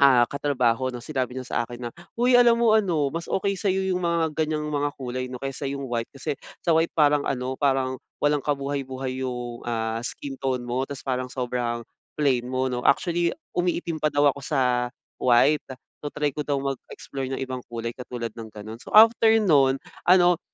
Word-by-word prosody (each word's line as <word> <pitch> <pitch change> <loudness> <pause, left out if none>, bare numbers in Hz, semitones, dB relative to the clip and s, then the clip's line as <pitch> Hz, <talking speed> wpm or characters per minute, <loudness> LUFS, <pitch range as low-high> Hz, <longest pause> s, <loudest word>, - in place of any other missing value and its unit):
ah, 130 -3 +7
katrabaho 130 -3 0
'no, 120 - -6
sinabi 130 -3 -2
niya 130 -1 -5
sa - - -3
akin 120 0 -6
na, - - -11 0.3
"Hoy 245 +1 +5
alam 235 -1 +6
mo 220 -2 +5
ano 170 -9 +2
mas 165 +1 -4
okey 195 0 0
sa'yo 190 0 0 0.2
yung - - -2
mga 165 -2 +1
ganyang 155 0 -2
mga 145 -1 0
kulay 130 -1 -3
'no, 125 -1 -7
kaysa 135 +1 -5
yung 140 -1 -5
white, 115 -1 -2
kasi 135 +1 -3 0.3
sa 170 - +3
white 165 +1 +2
parang 150 -2 +4
ano 130 0 -2
parang 135 -2 +1 0.3
walang 145 0 +3
kabuhay-buhay 135 -2 -2
yung 120 -1 -5
ah, 115 -1 -1
skin 135 +1 -6
tone 130 -2 -1
mo. 125 +2 -1
'Tapos 140 0 -7
parang 130 -1 -1
sobrang 120 -2 -2 0.3
plain 130 -5 +2
mo, 130 +1 -1
'no." 125 - -2
Actually, 170 - +2 0.2
umiitim 175 -2 0
pa 155 - 0
daw 145 0 +5
ako 140 - -10
sa 145 -2 0 0.6
white, 135 +4 +4 0.4
so 150 - -6
try 150 -1 +1
ko 150 - -2
daw 145 -1 +1
mag-explore 135 0 -5
ng 135 - -3
ibang 130 -1 -4
kulay, 115 0 -4
katulad 120 -2 -5
ng 115 -1 -7
ganon. 110 +2 -8
So, - - -11
after 225 +1 +8
nun, 140 -8 +4 0.3
ano 180 -1 +6
135 Hz, 190 wpm, -25 LUFS, 125-150 Hz, 0.6 s, after